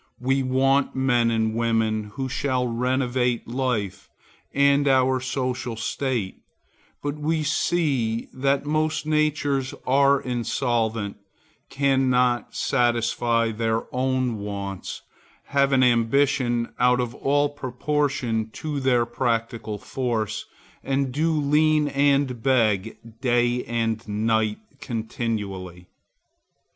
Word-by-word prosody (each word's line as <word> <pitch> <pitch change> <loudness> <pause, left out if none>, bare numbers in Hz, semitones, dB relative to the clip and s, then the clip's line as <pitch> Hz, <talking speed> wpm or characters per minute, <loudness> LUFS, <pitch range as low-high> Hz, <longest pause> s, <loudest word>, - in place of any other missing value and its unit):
We 135 +2 +1
want 135 +2 +2
men 120 -3 +2
and 110 -1 0
women 110 -2 0
who 135 -1 -2
shall 130 0 -1
renovate 125 0 0
life 120 -6 -2 0.4
and 140 0 +3
our 130 -1 +3
social 125 -2 -3
state, 115 -2 -2 0.6
but 145 +1 -3
we 155 +1 0
see 140 -8 0
that 140 +1 0
most 155 0 0
natures 150 -3 0
are 140 +1 +4
insolvent, 115 -4 -1 0.5
cannot 130 -3 +1
satisfy 120 -2 +1
their 115 0 -1
own 130 -3 0
wants, 100 -2 -5 0.4
have 140 -1 +1
an 130 -1 +4
ambition 120 0 +2
out 125 0 +4
of 120 -1 -2
all 145 +1 +1
proportion 130 -4 -1
to 150 -2 -4
their 125 -3 +2
practical 115 -2 -2
force 110 -2 -3 0.4
and 135 -1 0
do 155 +5 +1
lean 150 0 +2
and 140 -3 +1
beg 110 -5 +1 0.2
day 120 -1 +2
and 115 -1 -2
night 110 0 0 0.2
continually. 105 -7 -4
125 Hz, 105 wpm, -24 LUFS, 115-140 Hz, 0.6 s, are